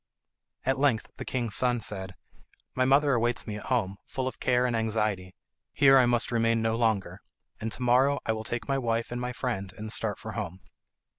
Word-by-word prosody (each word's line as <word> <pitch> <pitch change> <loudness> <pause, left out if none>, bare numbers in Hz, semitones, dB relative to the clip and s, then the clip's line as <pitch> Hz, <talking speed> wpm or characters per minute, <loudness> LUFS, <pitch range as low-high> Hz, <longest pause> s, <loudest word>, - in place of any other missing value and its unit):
At 135 +1 +1
length 135 -6 +1
the - - -6
king's 120 -4 -2
son 125 0 +3
said, 95 -4 -3 0.6
"My 130 - +1
mother 140 +2 +4
awaits 120 0 0
me 105 -1 -5
at - - -9
home, 105 -7 0
full 130 -1 -3
of 130 - -6
care 125 0 +2
and 120 -2 0
anxiety. 110 -4 -1 0.4
Here 135 -1 +6
I 125 - +4
must 120 -1 +1
remain 115 -1 +2
no 115 0 0
longer, 100 -5 0 0.4
and 110 +1 -4
to 125 - -4
morrow 130 +4 +3
I - - +1
will 110 0 -3
take 120 +2 -4
my 135 -1 +1
wife 115 -2 -1
and 120 0 -3
my 125 0 -2
friend 115 -6 -3
and 110 0 -2
start - - 0
for - - -7
home." 90 +3 -5
115 Hz, 205 wpm, -28 LUFS, 110-125 Hz, 0.6 s, Here